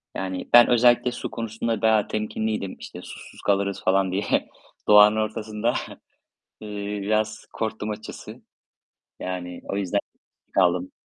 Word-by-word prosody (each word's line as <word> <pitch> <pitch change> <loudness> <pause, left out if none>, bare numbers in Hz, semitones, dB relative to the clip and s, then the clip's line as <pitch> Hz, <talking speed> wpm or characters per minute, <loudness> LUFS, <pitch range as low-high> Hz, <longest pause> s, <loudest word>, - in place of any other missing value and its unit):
Yani, 95 -1 -4
ben 120 0 +9
özellikle 120 0 +4
su - - -6
konusunda 115 0 -3
daha 110 -2 +3
temkinliydim, 110 -2 -2
işte, - - -9
susuz - - -11
kalırız 100 -1 0
falan 95 0 +2
diye. 100 +2 0 0.4
Doğanın 105 0 +8
ortasında, 110 +1 -1 0.9
eee, 105 -1 -5
biraz 110 +1 -1
korktum 110 -1 -3
açıkçası. 105 +1 -8 0.8
Yani 90 -1 -5
o 100 - -1
yüzden 100 0 0 0.6
kaldım. 90 -1 +2
105 Hz, 120 wpm, -24 LUFS, 95-110 Hz, 0.9 s, ben